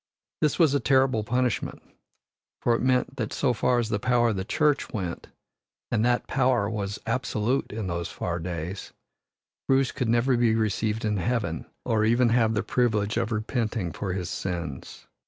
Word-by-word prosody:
This 150 - +1
was 160 -5 +4
a 140 - +3
terrible 130 -5 +3
punishment, 125 +1 -1 0.8
for 120 - +3
it 115 - 0
meant 130 +1 +1
that 110 -4 -2
so 130 -3 +1
far 125 +1 +2
as 120 -2 0
the 105 - 0
power 120 +1 +3
of 110 - -1
the 95 - -2
Church 150 +7 +1
went 95 -8 -4 0.6
and 115 -2 +2
that 120 0 +2
power 125 -5 +2
was 105 -1 -3
absolute 120 +1 -1
in 110 -1 -4
those 85 -2 -2
far 85 0 -3
days 90 +2 -5 0.7
Bruce 135 -1 +3
could 125 - -2
never 120 +3 +3
be 115 -2 +3
received 110 0 0
in 105 -1 0
Heaven 90 - -1 0.2
or 110 -2 +2
even 120 +2 +4
have 115 -1 +3
the 105 - 0
privilege 110 -4 +1
of 115 0 -1
repenting 110 -4 -1
for 95 +5 -3
his 90 -2 -3
sins. 85 -7 -5
115 Hz, 175 wpm, -26 LUFS, 100-125 Hz, 0.8 s, was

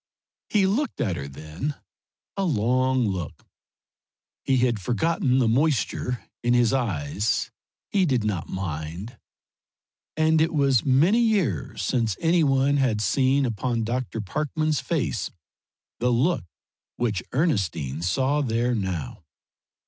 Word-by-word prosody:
He 205 -3 +3
looked 225 +7 -1
at 95 -6 0
her 70 -4 -5
then 80 - -5 0.6
a 195 - -1
long 130 - +2
look. 90 -6 -4 1.0
He 135 - +2
had 120 -4 +1
forgotten 130 - +1
the 125 -3 +3
moisture 125 -1 0 0.2
in 120 +1 +2
his 120 -1 +3
eyes, 105 - -1 0.4
he 190 -3 +3
did 130 -6 +1
not 100 -6 -2
mind. 90 +3 -5 1.0
And 160 0 +3
it 165 +1 +1
was 140 -4 +3
many 155 - +4
years 185 - 0
since 115 -6 0
any 165 0 +3
one 135 0 +3
had 125 -6 +1
seen 130 +6 +2
upon 115 0 -1
Dr. 115 0 -2
Parkman's 150 - -1
face - - -2 0.7
the 125 - +1
look 125 - +1 0.5
which 110 -6 -1
Ernestine 85 - 0
saw 130 +11 +1
there 120 -1 0
now. 95 - -3
125 Hz, 125 wpm, -25 LUFS, 100-145 Hz, 1.0 s, many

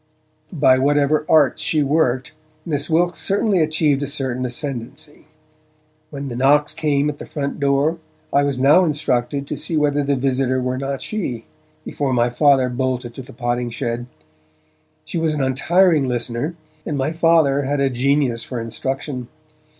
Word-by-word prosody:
By 130 -5 +4
whatever 145 +2 +2
arts 150 -5 +4
she 155 -2 +1
worked, 135 -3 0 0.3
Miss 150 -3 -2
Wilkes 175 +2 +1
certainly 200 -1 +1
achieved 155 -3 +1
a 145 - -2
certain 130 -3 -3
ascendancy. 135 +3 -6 0.8
When 140 -2 -6
the 120 - -5
knocks 145 +4 +3
came 150 -2 0
at 145 -1 -4
the - - -8
front 140 -2 -4
door, 140 +4 +1 0.3
I 140 - +4
was 140 -2 -1
now 145 +8 +5
instructed 140 -4 -1
to - - -4
see 165 - -2
whether 145 -1 +2
the 140 0 +1
visitor 130 0 0
were 130 0 -2
not 135 0 -4
she, 130 - -4 0.4
before 140 -3 -2
my 120 0 +2
Father 135 0 +4
bolted 125 -1 -2
to 130 - -8
the 130 - -12
potting 120 0 -2
shed. 115 +1 -4 1.0
She 170 - -3
was 160 -1 0
an 145 - -1
untiring 155 +3 +3
listener, 120 +5 -2 0.3
and 150 - -3
my 135 +3 0
Father 160 -4 +3
had 140 +1 -1
a 135 -1 +1
genius 130 -2 +1
for 125 - -5
instruction. 130 +3 -4
140 Hz, 160 wpm, -20 LUFS, 130-150 Hz, 1.0 s, now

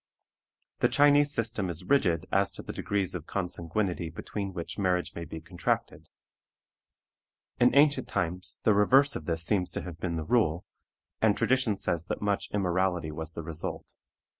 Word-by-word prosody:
The - - +3
Chinese 145 0 +5
system 115 -6 -1
is 85 -1 -5
rigid 90 - +2
as 100 0 +2
to - - -7
the - - -6
degrees 100 -3 -1
of 85 -3 -6
consanguinity 90 -1 -2
between 100 +4 -5
which 90 +2 -6
marriage 90 -2 0
may 85 - -6
be 80 - -7
contracted. 85 +2 -3 1.5
In 125 +2 +4
ancient 145 -2 +4
times 90 0 -2
the 110 - +5
reverse 135 +8 +4
of 75 - -5
this 85 0 -1
seems 95 -3 +1
to - - -3
have 85 -2 -8
been 85 -2 -2
the 80 - -2
rule, 90 -6 +1 0.6
and 110 -2 +3
tradition 130 -6 +2
says 85 -3 -2
that - - -3
much 100 -1 -1
immorality 90 -4 0
was 80 +1 -4
the 85 - -6
result. 80 0 -5
95 Hz, 165 wpm, -29 LUFS, 85-110 Hz, 1.5 s, Chinese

